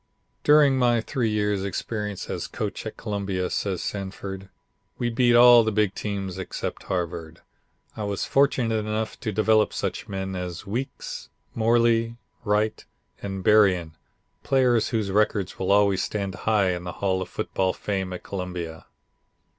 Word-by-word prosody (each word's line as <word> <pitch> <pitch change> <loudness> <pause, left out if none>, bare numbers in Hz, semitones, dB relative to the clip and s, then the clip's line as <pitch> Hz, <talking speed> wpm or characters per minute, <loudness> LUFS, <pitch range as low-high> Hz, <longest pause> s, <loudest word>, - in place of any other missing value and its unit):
"During 145 -3 +5
my 120 -2 +3
three 115 0 -1
years' 105 -2 0
experience 105 0 -4
as - - -4
coach - - -4
at - - -7
Columbia," 100 -4 -2
says 95 -3 -2
Sanford, 95 -1 -5 0.5
"we 120 -1 -1
beat 120 0 +3
all 120 -1 +8
the 110 - 0
big 105 -2 +1
teams 95 -3 -4
except 95 - -5
Harvard. 85 -2 -4 0.5
I 105 - -4
was 100 -1 -2
fortunate 135 -4 +2
enough 110 +1 -3
to 110 - -3
develop 110 +1 +3
such - - -3
men 95 -1 -4
as 90 -1 -5
Weekes, 120 +7 -5 0.2
Morley, 115 0 +2 0.3
Wright, 105 0 0 0.4
and 95 -1 -5
Berrien, 90 -7 +4 0.5
players 125 -4 +2
whose 110 -5 -1
records 105 -2 +1
will 95 - 0
always 100 -2 +4
stand 100 -2 -3
high 105 -3 +1
in 90 -1 -4
the 90 - -5
Hall 95 -2 -1
of 95 - -5
Football 95 -1 -1
Fame 95 -1 -3
at 90 - -6
Columbia. 90 -4 -6
105 Hz, 145 wpm, -25 LUFS, 95-115 Hz, 0.5 s, all